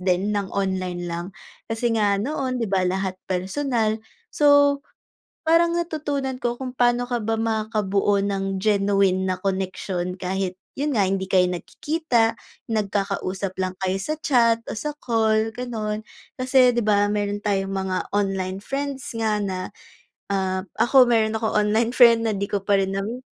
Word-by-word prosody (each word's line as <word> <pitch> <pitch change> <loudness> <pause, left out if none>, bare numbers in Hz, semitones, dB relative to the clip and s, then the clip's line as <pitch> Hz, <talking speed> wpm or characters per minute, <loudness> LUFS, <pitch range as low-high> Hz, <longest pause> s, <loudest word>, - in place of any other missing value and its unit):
din 185 +3 +1
ng 200 -2 -1
online 185 -2 -2
lang. 170 +1 -4 0.4
Kasi 225 +1 0
nga 205 -2 +3
noon 260 +3 -2
'di 230 -2 -1
ba 190 -2 +2
lahat 190 0 -2
personal, 220 +4 -1 0.3
so 285 -1 +5 0.7
parang 335 +1 +4
natutunan 290 -5 -2
ko 240 0 -1
kung 255 -1 -5
pa'no 245 0 +2
ka 240 -3 -1
ba 225 0 0
makakabuo 210 -3 +1
ng 195 -1 -1
genuine 195 -2 +2
na 185 -1 -1
connection 185 -1 -2
kahit, 185 0 -3 0.2
'yun 290 +1 -1
nga, 200 -5 +2
hindi 190 0 -1
kayo 185 -1 +3
nagkikita, 230 - 0 0.3
nagkakausap 195 -3 -2
lang 185 -1 -1
kayo 190 0 0
sa 305 +11 -2
chat 235 -7 +3
o - - -4
sa 300 +6 -3
call 220 -2 +2
gano'n. 220 -3 -3 0.3
Kasi 255 -1 +4
'di 235 - +1
ba 205 -1 +3
meron 205 0 -1
tayong 195 -2 -1
mga 190 -1 -2
online 195 -1 -1
friends 275 +2 -4
nga 215 -2 0
na, 185 -2 -3 0.6
ah, 190 -1 -1 0.2
ako 255 +1 +6
meron 225 -2 +2
akong 220 0 -1
online 215 +3 +2
friend 235 -2 +6
na 220 - +1
di 200 0 -2
ko 200 -1 -2
pa 200 0 +3
rin 195 0 -1
nami 225 +6 -3
210 Hz, 155 wpm, -23 LUFS, 190-240 Hz, 0.7 s, ako